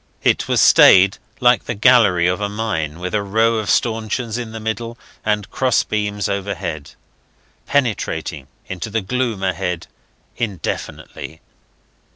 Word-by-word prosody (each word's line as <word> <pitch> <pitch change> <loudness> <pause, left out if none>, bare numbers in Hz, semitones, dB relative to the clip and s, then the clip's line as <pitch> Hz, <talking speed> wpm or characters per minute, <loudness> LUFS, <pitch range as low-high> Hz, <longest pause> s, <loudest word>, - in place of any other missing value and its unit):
It - - +2
was - - +1
stayed 95 +1 +6 0.2
like 120 0 +3
the 115 - -3
gallery 105 -6 +4
of 90 +3 0
a 105 - -1
mine, 90 -8 -3
with 90 +1 -5
a 105 - +1
row 110 +3 +1
of 105 - -4
stanchions 115 0 0
in 120 -2 -5
the 110 - -7
middle, 115 +2 -4 0.3
and 105 -2 -1
cross 130 -2 +1
beams 105 -1 -2
overhead, 90 -7 -4 0.7
penetrating 115 - -1 0.2
into 95 +3 -6
the 110 +1 -1
gloom 115 -1 -2
ahead 90 -2 -2 0.5
indefinitely. 95 -6 -5
105 Hz, 135 wpm, -19 LUFS, 95-115 Hz, 0.7 s, stayed